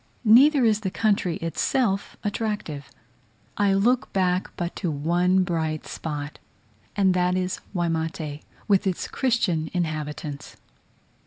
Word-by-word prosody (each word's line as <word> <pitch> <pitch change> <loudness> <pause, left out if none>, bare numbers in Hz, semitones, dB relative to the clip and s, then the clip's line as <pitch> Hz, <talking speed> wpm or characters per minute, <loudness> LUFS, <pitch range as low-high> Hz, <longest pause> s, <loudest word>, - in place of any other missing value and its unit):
Neither 260 +5 +6
is 215 -2 +3
the 205 -3 -2
country 200 -4 +1
itself 195 +4 0
attractive. 205 - -3 0.7
I 200 -1 +2
look 240 +6 +2
back 185 -1 +1
but 175 -2 -3
to 180 - -2
one 175 +5 +2
bright 160 -3 -2
spot, 145 -2 -5 0.6
and 195 -3 +3
that 180 0 +1
is 185 0 -1 0.2
Waimate, 160 -3 -2 0.3
with 200 -1 +3
its 185 - -2
Christian 195 - 0
inhabitants. 150 -3 -4
180 Hz, 115 wpm, -25 LUFS, 160-205 Hz, 0.7 s, Neither